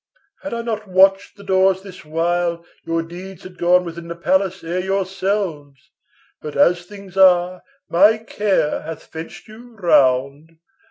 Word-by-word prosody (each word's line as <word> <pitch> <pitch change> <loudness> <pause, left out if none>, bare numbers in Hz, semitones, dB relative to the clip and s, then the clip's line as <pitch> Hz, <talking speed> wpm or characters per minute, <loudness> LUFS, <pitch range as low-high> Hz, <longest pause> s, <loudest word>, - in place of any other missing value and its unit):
Had 290 - -6
I 235 - -4
not 215 -2 -4
watched 195 +2 +3
the 200 - -13
doors 190 0 +2
this 190 -2 -12
while, 170 +2 -1 0.2
your 165 0 -1
deeds 180 +2 -10
Had 180 -1 -12
gone 180 +1 +3
within 170 0 -8
the 170 - -6
palace 190 +2 0
ere 170 +2 -2
yourselves. 185 -6 -3 0.5
But, 150 - -7
as 175 0 +3
things 200 -2 -12
are, 180 -1 +4 0.3
my 205 +6 +4
care 205 -7 -1
hath 160 0 -8
fenced 160 0 -10
you 230 +2 -14
round. 145 -3 +1
180 Hz, 150 wpm, -20 LUFS, 165-195 Hz, 0.5 s, are